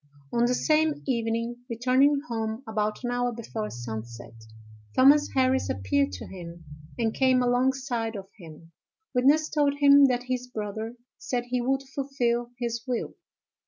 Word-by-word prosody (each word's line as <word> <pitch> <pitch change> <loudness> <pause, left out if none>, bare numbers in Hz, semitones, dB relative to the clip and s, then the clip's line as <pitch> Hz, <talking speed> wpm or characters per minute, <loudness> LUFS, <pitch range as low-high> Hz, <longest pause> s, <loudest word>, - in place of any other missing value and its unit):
On 235 0 +3
the 250 +1 +2
same 310 +1 +1
evening, 230 -1 -1
returning 260 +5 +3
home 225 +1 -3
about 215 +1 -2
an 245 - -1
hour 245 0 0
before 220 -2 -5
sunset, 115 0 -7 0.6
Thomas 285 +3 +6
Harris 260 0 +2
appeared 95 +6 0
to 90 - -6
him, 170 -3 -10 0.3
and 225 -2 0
came 260 -1 +3
alongside 245 -2 0
of 195 -1 -7
him. 165 -1 -13 0.4
Witness 285 +5 +4
told 290 -2 +1
him 285 0 +7
that 250 -2 +1
his 250 0 -3
brother 220 0 -5 0.2
said 245 -2 -2
he 250 0 0
would 270 +2 0
fulfil 240 -4 -1
his 235 -1 -3
will. 245 -2 -2
245 Hz, 145 wpm, -27 LUFS, 220-265 Hz, 0.6 s, him